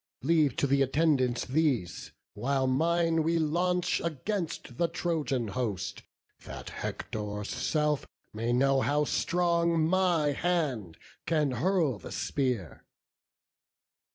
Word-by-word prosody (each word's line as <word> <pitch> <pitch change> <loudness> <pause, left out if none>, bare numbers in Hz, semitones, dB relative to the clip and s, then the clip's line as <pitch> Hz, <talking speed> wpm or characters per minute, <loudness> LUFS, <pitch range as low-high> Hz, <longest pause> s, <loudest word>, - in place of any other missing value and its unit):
Leave 150 -3 +3
to - - +1
th' 140 0 +2
attendants 135 -3 +2
these; 130 - 0 0.2
while 135 +1 0
mine 165 +4 +2
we 165 +2 +1
launch 175 +3 +1
Against 165 - -4
the 170 - +3
Trojan 150 -10 -1
host, 105 -4 -3 0.4
that - - -8
Hector's 105 -1 -5
self 150 -2 0 0.3
May 115 +2 -2
know 135 +2 +3
how 150 +2 +1
strong 170 0 +1
my 175 -4 +2
hand 140 - -1 0.3
can 155 -4 +2
hurl 155 - +1
the - - -9
spear." 125 - -2
145 Hz, 110 wpm, -29 LUFS, 125-170 Hz, 0.4 s, Leave